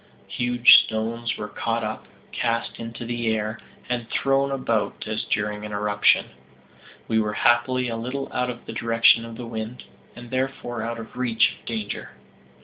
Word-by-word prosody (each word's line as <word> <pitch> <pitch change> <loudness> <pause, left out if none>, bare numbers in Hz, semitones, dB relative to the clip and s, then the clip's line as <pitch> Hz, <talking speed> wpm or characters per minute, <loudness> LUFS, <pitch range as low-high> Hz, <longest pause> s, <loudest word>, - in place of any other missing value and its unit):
Huge 120 0 +7
stones 115 +1 -3
were 105 - -4
caught 115 +2 -2
up, 110 0 -4 0.2
cast 115 -1 -1
into 115 +1 -6
the 120 0 -2
air, 110 0 -1 0.3
and 120 -2 -3
thrown 135 0 +2
about 125 -5 -1
as 110 0 -2
during 105 0 -1
an 105 - -6
eruption. 105 0 +3 0.8
We 110 - +2
were 105 -1 0
happily 120 +3 +3
a 115 - -2
little 125 +4 -3
out 125 - 0
of 120 -1 -7
the - - -7
direction 115 0 +4
of 115 -1 -9
the 120 - -6
wind, 115 +1 -6 0.3
and 120 0 -11
therefore 130 -3 -2
out 115 +1 -3
of 115 +1 -9
reach 120 -3 +3
of - - -26
danger. 110 -3 -4
115 Hz, 165 wpm, -24 LUFS, 110-120 Hz, 0.8 s, Huge